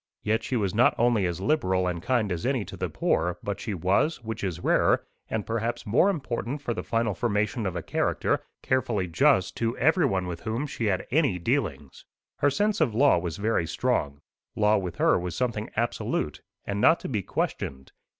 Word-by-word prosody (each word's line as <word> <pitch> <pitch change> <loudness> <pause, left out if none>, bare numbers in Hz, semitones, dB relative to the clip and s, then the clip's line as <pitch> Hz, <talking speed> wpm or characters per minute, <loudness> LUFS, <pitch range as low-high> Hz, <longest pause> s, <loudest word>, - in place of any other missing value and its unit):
Yet 110 +2 +1
she 125 - -3
was 100 -5 0
not 115 +4 +4
only 115 -5 +3
as 85 0 -3
liberal 95 -9 +1
and 85 -2 -2
kind 120 -2 0
as 85 -2 -3
any 125 -4 0
to 95 - -9
the 90 -1 -3
poor, 90 +3 0
but 100 -1 -3
she 105 -4 -3
was, 100 - +1
which 115 -1 -5
is 90 -3 -3
rarer, - - +3 0.2
and 110 -2 -2
perhaps 115 +2 -2
more 120 - +4
important 140 -5 -3
for 120 - -1
the - - -4
final 115 -2 0
formation 105 0 -1
of 90 - -4
a 85 - -3
character, - - 0 0.2
carefully 120 -7 0
just 95 - +3
to 115 +1 -1
everyone 135 - +2
with 85 -2 -5
whom 115 +6 -2
she 120 -5 -4
had 95 -3 0
any 140 - +2
dealings. 85 - -2 0.3
Her 145 - +3
sense 205 +7 0
of 120 -9 +2
law 135 -7 +5
was 85 0 -4
very 105 -5 0
strong. 70 -1 -1 0.3
Law 105 0 +3
with 90 -3 -5
her - - +3
was 90 -1 -4
something 115 -4 -2
absolute, 120 +2 -1 0.2
and 100 0 -2
not 160 +8 +5
to - - -5
be 110 -6 -1
questioned. 65 -6 -3
110 Hz, 195 wpm, -27 LUFS, 90-125 Hz, 0.3 s, law